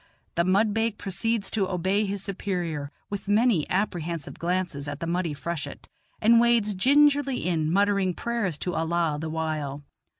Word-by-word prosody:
The 170 - +2
mudbake 210 +4 +2
proceeds 200 +2 -1
to 200 -4 0
obey 190 +4 +1
his 200 -1 -3
superior, 175 -7 -3 0.2
with 200 -1 -5
many 210 -5 +3
apprehensive 170 -5 -2
glances 170 -5 -2
at 145 0 -5
the - - -3
muddy 170 -2 -1
freshet, 145 0 -5 0.3
and 230 +2 +6
wades 235 -3 +3
gingerly 280 +3 +3
in, 160 -3 0
muttering 200 -1 +2
prayers 230 -9 -1
to 180 +4 -3
Allah 165 -2 0
the 160 - -3
while. 155 -3 -3
185 Hz, 145 wpm, -26 LUFS, 160-210 Hz, 0.3 s, and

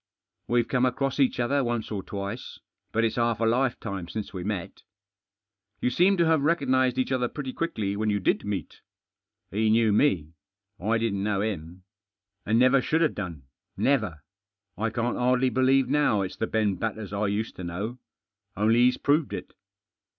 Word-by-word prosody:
« - - -56
WeVe 120 0 +3
fome 130 0 +2
across 135 +2 -1
each 130 -2 +2
other 140 +4 +2
onte 120 -3 -2
or 100 -2 -2
twite, 100 +5 -5 0.5
fiat 115 - +1
it's 115 - 0
half 115 -2 +1
a 115 - +1
lifetime 115 -6 0
since 100 +3 -5
we 90 -2 -5
met." 100 -3 -4 1.0
"You 125 - 0
seem 185 +8 +4
to 170 - +3
have 160 -2 +3
recognised 130 -5 +2
each 130 0 0
othef 125 -2 -1
pretty 135 -4 -4
quickly 110 -13 -2
Whett 110 +1 0
ydti 100 -2 -1
did - - +2
meet." 100 -2 -5 0.7
"He 110 +2 +1
knew 110 -1 +4
me. 90 - +2 0.5
I 110 +5 +1
didn't 110 -4 -1
know 100 -1 0
him. 90 -4 -4 0.6
And 110 +2 +3
never 130 +2 +5
should 160 +5 +1
have 155 - +2
done 85 -8 -6 0.2
— - - -49
never. 105 - 0 0.5
I 115 +2 -1
can't 115 +2 -1
hardly 125 +1 +2
believe 130 0 +3
now 135 -7 +2
it's 95 - -6
the 110 - -1
Beh 105 -4 0
Batters 110 -2 -4
I 100 +1 0
used 105 +3 -2
to 95 - -6
know. 100 +9 -4 0.6
Only 110 +3 +3
he's 125 - +3
proved 145 0 +1
it. - - -6
115 Hz, 180 wpm, -26 LUFS, 100-130 Hz, 1.0 s, never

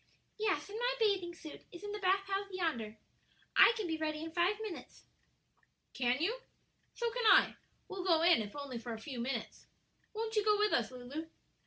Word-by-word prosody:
"Yes; 425 -2 0
and 420 +2 -6
my - - +1
bathing 385 -6 +1
suit 315 -2 -10
is 350 +3 -11
in 415 - -5
the 420 - -4
bath 390 0 +2
house 395 +1 -2
yonder. 280 - -2 0.6
I - - +9
can 435 - -2
be 325 -2 -1
ready 310 0 -2
in 325 - -6
five 360 +5 +1
minutes." 430 -6 -8 0.9
"Can 250 -1 +1
you? 435 +10 0 0.6
So 475 -1 -1
can 485 -1 0
I; - - +6 0.3
we'll 385 -2 -5
go 335 -3 +3
in 340 -9 +6
if 205 -1 -7
only 280 -4 -5
for 235 0 -5
a 220 - -6
few 250 +2 -6
minutes. 235 -1 -4 0.5
Won't 445 0 -3
you 425 - +3
go 420 0 +4
with 420 0 +2
us, 230 -2 +2
Lulu?" 255 +6 -7
350 Hz, 195 wpm, -34 LUFS, 280-415 Hz, 0.9 s, I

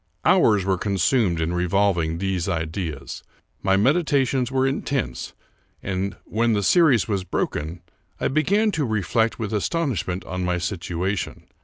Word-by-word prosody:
Hours 105 -4 +4
were 95 -2 +1
consumed 100 -1 +1
in 80 +2 -1
revolving 90 -2 +1
these 95 -1 -1
ideas. 80 -5 -4 0.4
My 95 0 +3
medi 140 - +3
tations 135 -5 +1
were 130 0 +1
intense; 135 0 -2 0.5
and, 95 +1 -2
when 115 +1 +1
the 100 -1 0
series 145 - +4
was 100 -4 -1
broken, 85 -2 -3 0.4
I - - +1
began 200 +10 +2
to 160 - -1
reflect 110 +1 0
with 110 -2 -4
astonishment 105 - -1
on 90 0 -4
my 90 0 0
situation. 90 +2 -3
100 Hz, 140 wpm, -23 LUFS, 90-125 Hz, 0.5 s, Hours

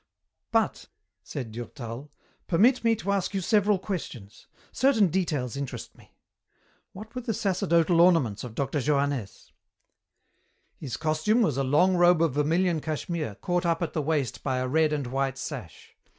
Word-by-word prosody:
"But," - - 0 0.3
said 125 -6 -6
Durtal, 120 +3 -7 0.4
"permit 235 +10 +3
me 230 -1 +3
to 200 -2 -3
ask 200 0 -1
you 195 - 0
several 210 +1 +3
questions. 145 - -7 0.2
Certain 230 -7 +3
details 150 -9 -1
interest 140 -1 -6
me. - - -21 0.8
What 215 +3 -11
were 250 - -4
the 230 -3 -3
sacerdotal 175 -5 +2
ornaments 165 - +3
of 120 -3 -8
Dr. 140 +3 -1
Johannès?" 140 -6 -1 1.2
"His 135 -6 -6
costume 160 +9 +1
was 150 - 0
a 135 - +1
long 175 +8 +3
robe 175 -1 +5
of 160 -6 +1
vermilion 165 +4 +1
cashmere 155 - -4
caught 180 0 0
up 170 0 0
at 170 - -4
the 155 - 0
waist 145 -5 -1
by 130 -2 -1
a 130 0 -1
red 155 +3 +2
and 145 -3 -1
white 135 +1 -2
sash. 135 - -8
155 Hz, 155 wpm, -27 LUFS, 135-185 Hz, 1.2 s, robe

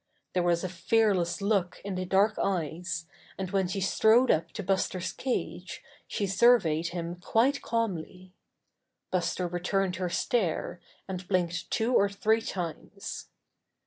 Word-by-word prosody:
There 180 - +2
was 175 0 +2
a - - 0
fearless 190 -1 +1
look 200 -4 +1
in 200 - -3
the 185 0 -2
dark 195 +4 +2
eyes, 175 -1 -2 0.3
and 190 -1 -4
when 195 -2 +1
she 195 +2 -2
strode 220 +6 +4
up 160 - 0
to 210 - -5
Buster's 185 -1 0
cage 180 -8 -3 0.2
she 205 - -1
surveyed 190 -6 +4
him 170 0 -4
quite 240 +10 +2
calmly. 185 -5 -3 0.8
Buster 180 0 0
returned 180 +1 -1
her 180 -1 -1
stare, 180 -3 -1 0.3
and 185 -1 -5
blinked 175 -3 0
two 230 +3 0
or 200 -4 +4
three 210 +3 +2
times. 190 +1 -5
185 Hz, 140 wpm, -29 LUFS, 175-205 Hz, 0.8 s, strode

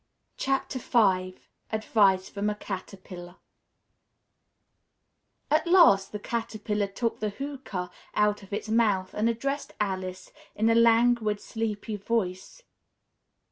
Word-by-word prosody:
V 270 - -1 1.2
ADVICE 200 -3 +2
FROM 205 +1 -2
A 210 - -2
CATERPILLAR 185 -3 -8 2.2
At 310 +3 +3
last 325 - +6
the 210 - -4
Caterpillar 215 -2 -2
took 230 +4 -3
the 215 - -1
hookah 205 -7 -6 0.2
out 210 0 +2
of 195 - -15
its 205 +2 -3
mouth 210 -4 +1
and 220 +2 +1
addressed 275 +5 -3
Alice 185 -2 -3 0.2
in 220 +2 +2
a - - +5
languid, 230 -2 +4
sleepy 220 -1 -4
voice. 200 - -3
210 Hz, 105 wpm, -27 LUFS, 195-230 Hz, 2.2 s, last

